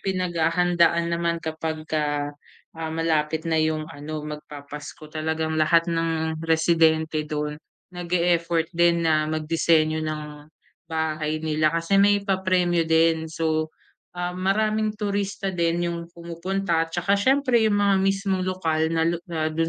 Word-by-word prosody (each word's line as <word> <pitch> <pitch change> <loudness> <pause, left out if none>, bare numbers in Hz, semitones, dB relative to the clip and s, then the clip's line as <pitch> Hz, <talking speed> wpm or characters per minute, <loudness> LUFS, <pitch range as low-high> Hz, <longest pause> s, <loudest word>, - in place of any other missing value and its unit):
pinaghahandaan 170 -2 +1
naman 170 0 0
kapagka, 155 -2 -2 0.4
ah, 160 0 -5
malapit 160 -1 0
na 160 -1 +1
'yong 155 0 0
ano, 150 +1 -6
magpapasko. 150 0 -9
Talagang 160 0 -2
lahat 165 +2 +4
ng 160 -1 -1
residente 160 -1 +2
do'n, 150 0 -3 0.3
nag-e-effort 170 -1 0
din 170 0 +3
na 155 -1 +2
magdisenyo 155 0 +1
ng 155 -1 -3 0.7
bahay 155 -1 -1
nila 155 0 +1
kasi 165 +4 +1
may 205 0 +4
papremyo 185 -3 +1
din. 160 0 +3
So, 155 0 -1 0.4
ah, 180 0 -2
maraming 215 +3 +1
turista 200 -1 -2
din 170 0 0
'yong 170 0 -3
pumupunta 170 0 -2
'tsaka 175 +3 +1
siyempre 255 +3 +3
'yong 215 - +3
mga 200 -1 +3
mismong 195 -1 0
lokal 160 -4 0
na 165 0 +1
lu 170 - 0
na 160 -2 -1
do'n 165 +1 0
165 Hz, 130 wpm, -24 LUFS, 155-180 Hz, 0.7 s, lahat